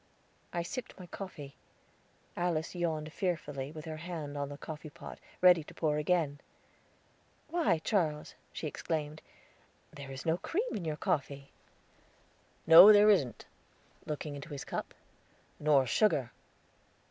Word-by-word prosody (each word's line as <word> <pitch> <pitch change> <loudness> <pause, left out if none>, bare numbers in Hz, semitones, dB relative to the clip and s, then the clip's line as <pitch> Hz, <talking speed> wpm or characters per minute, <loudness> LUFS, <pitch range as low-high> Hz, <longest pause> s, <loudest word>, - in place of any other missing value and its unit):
I 170 - -2
sipped 250 +3 -7
my 180 - -8
coffee; 165 -7 -8 0.8
Alice 170 -2 -1
yawned 160 -3 -2
fearfully, 150 -7 -3
with 155 -1 -9
her 160 -1 -6
hand 155 -3 -6
on 140 -1 -3
the 145 - -8
coffee 155 +1 -8
pot, - - -11 0.2
ready 180 -3 +6
to - - -13
pour 150 -2 0
again. 150 -2 0 1.1
"Why, 280 - +2
Charles," 160 -4 -1 0.2
she - - -6
exclaimed, 155 0 -3 0.7
"there 140 -1 -9
is 135 0 -8
no 165 +1 +2
cream 435 +9 -2
in 185 - -4
your 155 -1 -2
coffee." 140 -1 -2 1.1
"No, 165 +6 +11
there 210 0 +7
isn't," 140 - 0 0.6
looking 150 0 -4
into 140 +3 -8
his 140 -3 -6
cup; - - -5 0.6
"nor 145 -3 +4
sugar." 135 - +2
155 Hz, 135 wpm, -31 LUFS, 145-175 Hz, 1.1 s, No